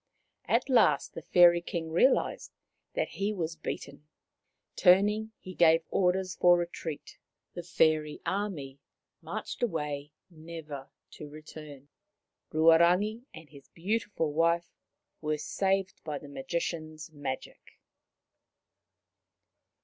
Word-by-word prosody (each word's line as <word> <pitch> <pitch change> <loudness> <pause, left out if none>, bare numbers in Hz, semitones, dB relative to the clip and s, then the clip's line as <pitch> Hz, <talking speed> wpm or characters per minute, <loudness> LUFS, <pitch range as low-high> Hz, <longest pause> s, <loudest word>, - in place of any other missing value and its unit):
At - - +1
last 220 - +3
the - - -7
Fairy 175 +1 +5
King 170 -2 -5
realized 255 +11 +2 0.4
that - - 0
he 200 +2 -2
was 165 -3 -3
beaten. 150 -1 -7 0.7
Turning, 210 +4 +4
he 185 - -10
gave 165 -1 +4
orders 185 0 +1
for 175 0 +5
retreat. 170 -3 -6 0.3
The 175 - -5
fairy 155 -3 +1
army 165 -10 -3 0.4
marched - - -6
away, 150 -9 -2 0.2
never 155 -4 -9 0.2
to 150 - -10
return. 150 -2 -11 0.6
Ruarangi 175 +8 +4
and 160 -1 -12
his 140 -3 -15
beautiful 180 -3 -2
wife 170 +2 +1 0.5
were 155 -1 -1
saved 195 +4 -1
by 150 -2 -4
the 145 - -11
Magician's 155 +2 -4
magic. 145 -3 -6
165 Hz, 105 wpm, -29 LUFS, 150-185 Hz, 0.7 s, Fairy